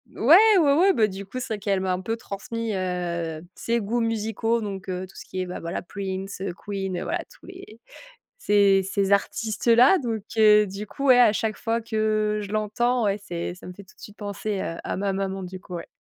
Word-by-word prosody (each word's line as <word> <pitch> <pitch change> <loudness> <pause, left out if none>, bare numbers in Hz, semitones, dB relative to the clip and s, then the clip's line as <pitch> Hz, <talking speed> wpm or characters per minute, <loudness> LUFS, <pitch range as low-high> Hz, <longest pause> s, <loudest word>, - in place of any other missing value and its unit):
Ouais, 310 - +7 0.2
ouais, 290 -4 +4
ouais, 370 +6 +4
beh 220 -9 +3
du 195 0 -7
coup, 255 +6 -6
c'est 220 -4 -4
qu'elle 200 -1 0
m'a 185 -1 0
un 180 - -3
peu 225 +4 -3
transmis, 225 +2 -5
heu, 170 -3 -3
ses 235 0 -1
goûts 230 +3 -1
musicaux, 225 +1 -1
donc 195 -2 -6
heu, 185 0 -3
tout 190 - -19
ce - - -9
qui 185 - -6
est 185 - -2
ben 180 - -6
voilà 170 0 -4
Prince, 195 0 -6
heu, 190 -2 -3
Queen, 195 -1 -4
voilà - - -2
tous - - -19
les 370 - -12 0.6
ces 200 - +4
ces 195 0 0
artistes 210 +3 0
là, 245 +10 +7
donc 225 -5 -3
heu, 210 -1 +6
du 200 +3 -7
coup, 275 +6 -5
ouais 255 -2 +7
à 240 -4 +7
chaque 220 0 -1
fois 230 0 -1
que 215 -1 0
je 200 - -8
l'entends, 230 +3 0
ouais, 200 0 0
c'est 175 -2 -4
ça 180 - -14
me 180 - -8
fait 200 - -12
tout 190 - -21
de - - -21
suite 210 - -12
penser, 205 0 -4
heu, 165 - -4
à - - -3
ma 195 0 -1
maman 195 0 -3
du 185 +1 -7
coup, 180 - -8
ouais. 170 - -7
205 Hz, 230 wpm, -24 LUFS, 190-225 Hz, 0.6 s, Ouais